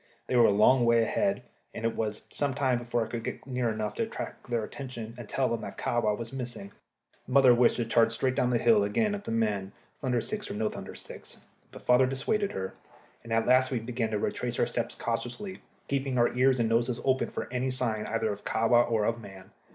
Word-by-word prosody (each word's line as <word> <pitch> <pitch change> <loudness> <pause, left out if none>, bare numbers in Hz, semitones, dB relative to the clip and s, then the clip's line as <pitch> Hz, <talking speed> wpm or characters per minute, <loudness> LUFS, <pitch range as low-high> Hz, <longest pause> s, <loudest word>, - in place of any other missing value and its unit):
They - - -2
were 120 -1 +7
a - - +4
long 120 +5 +5
way 115 -1 +4
ahead, 195 - 0 0.3
and 115 - -4
it 115 - 0
was 110 -1 -3
some 140 -2 -1
time 130 -3 +1
before 120 -1 -1
I - - -9
could 115 0 -5
get - - -5
near 125 -3 -1
enough 110 -1 -2
to - - -4
attract - - -5
their 120 -2 0
attention 120 -2 -7
and 120 -3 -10
tell 135 -1 +1
them 115 - -2
that - - -7
Kahwa 110 -3 0
was 115 +1 -7
missing. 120 -6 -5 0.6
Mother 130 0 +6
wished 120 0 +4
to 120 - -1
charge 115 0 +3
straight 130 +3 0
down 125 -1 +1
the 125 - +2
hill 115 -3 +4
again 205 - +1
at 205 0 -5
the - - -5
men, 105 -4 -1 0.3
thunder 125 -4 0
sticks 210 - -4
or - - -4
no 105 0 0
thunder - - -8
sticks; - - -10 0.3
but - - -12
father 125 +1 +5
dissuaded 195 +11 -1
her, 95 0 -4 0.5
and 115 - -10
at 115 0 +2
last 130 +1 +4
we 130 - -1
began 115 0 -2
to 110 - -1
retrace - - -2
our - - +3
steps - - -3
cautiously, 190 - -4 0.3
keeping 135 -2 -1
our 120 0 +3
ears 130 0 +3
and 115 - +2
noses 120 +2 +1
open 130 -1 +2
for - - -5
any 125 +1 0
sign 115 -4 -1
either 110 -2 0
of 100 - -11
Kahwa 120 +2 +3
or 110 -3 +1
of 115 +1 -1
man. 95 -3 -12
120 Hz, 230 wpm, -29 LUFS, 110-130 Hz, 0.6 s, were